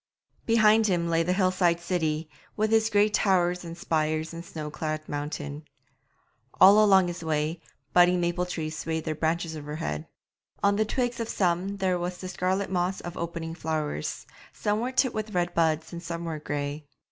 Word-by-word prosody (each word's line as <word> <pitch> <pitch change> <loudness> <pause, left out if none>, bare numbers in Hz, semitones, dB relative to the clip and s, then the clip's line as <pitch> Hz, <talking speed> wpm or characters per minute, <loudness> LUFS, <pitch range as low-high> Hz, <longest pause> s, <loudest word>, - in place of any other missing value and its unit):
Behind 220 -1 +5
him 175 -3 +1
lay 165 0 +2
the 170 +2 0
hill 185 -1 +2
side 175 -2 +2
city, 160 -3 -1 0.3
with 215 +1 +1
its 220 0 +4
grey 205 -1 +4
towers 180 -4 +2
and 170 0 -8
spires 155 -1 -1
and 170 0 -7
snow 155 -3 -6
clad 155 0 -4
mountain. 145 0 -5 1.0
All 200 +3 +8
along 190 -3 +5
his 175 -1 -5
way 155 +1 -1 0.3
budding 180 0 +5
maple 175 +1 0
trees 155 -3 -4
swayed 160 +1 -3
their 155 - -2
branches 165 +1 -1
overhead; 145 - -4 0.6
on 200 0 +4
the 215 - +2
twigs 245 +1 -1
of 230 -1 -3
some 185 +2 0
there 185 -2 +1
was 175 +1 -3
the 185 - -7
scarlet 185 +2 -1
moss 180 +1 0
of 175 0 -7
opening 165 -1 -4
flowers, 155 - -3 0.3
some 210 0 -1
were 245 +3 -2
tipped 260 -1 +2
with 215 -1 -4
red 175 0 0
buds 160 -1 +1
and 170 - -6
some 170 0 -5
were 160 -2 -4
grey. 145 0 -4
175 Hz, 180 wpm, -27 LUFS, 155-190 Hz, 1.0 s, All